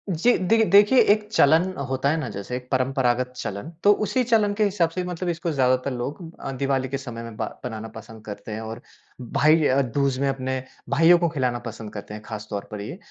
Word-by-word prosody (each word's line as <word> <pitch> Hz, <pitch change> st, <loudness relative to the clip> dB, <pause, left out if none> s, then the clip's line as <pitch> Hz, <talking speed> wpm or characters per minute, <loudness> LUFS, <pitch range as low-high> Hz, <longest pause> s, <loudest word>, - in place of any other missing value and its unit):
जी, 190 Hz, +8 st, +3 dB
देखि 220 Hz, +5 st, +3 dB
देखिए 205 Hz, +7 st, +6 dB
एक 210 Hz, 0 st, -4 dB
चलन 170 Hz, -2 st, +4 dB, 0.2 s
होता 135 Hz, +1 st, 0 dB
है 155 Hz, -, +1 dB
ना -, -, -3 dB
जैसे 100 Hz, +4 st, -5 dB
एक 125 Hz, 0 st, -6 dB
परंपरागत 130 Hz, -1 st, +1 dB
चलन, 100 Hz, +3 st, -5 dB
तो 205 Hz, -, +7 dB
उसी 215 Hz, +5 st, +1 dB
चलन 220 Hz, -4 st, +2 dB
के 215 Hz, +1 st, +1 dB
हिसाब 185 Hz, -5 st, +1 dB
से 180 Hz, +2 st, -3 dB
मतलब 180 Hz, 0 st, -3 dB
इसको 170 Hz, 0 st, -2 dB
ज़्यादातर 130 Hz, -1 st, +1 dB
लोग 125 Hz, +7 st, -4 dB, 0.2 s
अ, 135 Hz, -, -4 dB
दिवाली 135 Hz, 0 st, -1 dB
के 135 Hz, -, -2 dB
समय 120 Hz, -4 st, -7 dB
में 115 Hz, -1 st, -8 dB
ब -, -, -2 dB, 0.2 s
बनाना 110 Hz, -2 st, -5 dB
पसंद 110 Hz, 0 st, -11 dB
करते 105 Hz, +1 st, -8 dB
हैं 110 Hz, +1 st, -4 dB
और 110 Hz, +2 st, -7 dB, 0.4 s
भाई 140 Hz, +5 st, +3 dB
य 140 Hz, -1 st, +3 dB
दूज 140 Hz, -2 st, +1 dB
में 140 Hz, -, +1 dB
अपने 130 Hz, -1 st, -2 dB, 0.3 s
भाइयों 165 Hz, +5 st, +6 dB
को 170 Hz, -1 st, +1 dB
खिलाना 130 Hz, -6 st, -1 dB
पसंद 110 Hz, -2 st, -7 dB
करते 105 Hz, 0 st, -8 dB
हैं 105 Hz, 0 st, -8 dB
खासतौर 105 Hz, -2 st, -6 dB
पर 105 Hz, -1 st, -5 dB
ये। 105 Hz, -, -7 dB
135 Hz, 215 wpm, -24 LUFS, 115-170 Hz, 0.4 s, तो